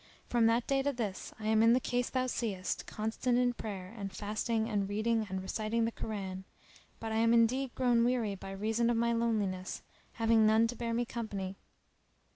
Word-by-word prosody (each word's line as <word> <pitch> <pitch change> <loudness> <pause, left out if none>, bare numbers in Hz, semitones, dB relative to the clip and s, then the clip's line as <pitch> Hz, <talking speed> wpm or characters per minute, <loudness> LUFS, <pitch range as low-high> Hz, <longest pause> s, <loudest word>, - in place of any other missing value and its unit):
From 235 -2 +3
that 230 +1 +2
day 275 -1 +2
to 285 +1 +1
this 220 -7 -4
I 215 - -7
am 220 0 +4
in 230 +1 +6
the 250 - +4
case 245 -1 -1
thou 255 -1 0
seest, 215 -7 -2
constant 220 +3 -1
in 245 0 +3
prayer 200 -4 -6
and 200 -3 -5
fasting 220 +2 -1
and 200 -3 -1
reading 220 +1 0
and 190 0 -3
reciting 220 +4 -1
the 230 - -1
Koran; 195 -5 -5 0.6
but 225 - -4
I 220 - 0
am 230 +1 +4
indeed 245 +3 +2
grown 240 -2 +3
weary 235 -4 +1
by 195 0 -8
reason 220 +4 0
of 240 - +2
my 235 0 +2
loneliness, 210 -5 -1 0.3
having 225 -1 +3
none 220 +1 +5
to 245 - -4
bear 230 -1 -2
me 240 +1 +1
company." 200 -5 -4
225 Hz, 195 wpm, -32 LUFS, 205-235 Hz, 0.6 s, in